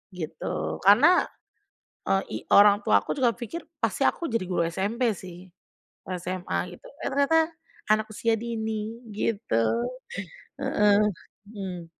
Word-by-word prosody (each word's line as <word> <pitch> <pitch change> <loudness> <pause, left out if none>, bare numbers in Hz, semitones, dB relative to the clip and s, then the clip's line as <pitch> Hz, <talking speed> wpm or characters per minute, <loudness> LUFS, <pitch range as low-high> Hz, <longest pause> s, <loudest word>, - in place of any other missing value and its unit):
gitu 80 - -4
karena, - - +6 0.8
eee, 95 0 +3
i - - -2 0.2
orang 205 0 +7
tua 100 -1 +5
aku - - -1
juga 250 -3 +3
pikir 295 +7 -6 0.2
pasti 225 +4 0
aku 340 - -1
jadi 230 -4 0
guru 175 -2 +1
SMP 210 +8 0
sih 180 0 -11 0.6
SMA 180 0 -3
gitu, - - -24 0.2
eh - - -1
ternyata 280 +4 +3 0.5
anak 215 0 +3
usia 225 +2 +1
dini 220 -1 -4 0.2
gitu. 200 - 0 0.8
Heeh, 205 -1 +3 0.5
mhm. 190 -5 -6
205 Hz, 125 wpm, -26 LUFS, 180-230 Hz, 0.8 s, orang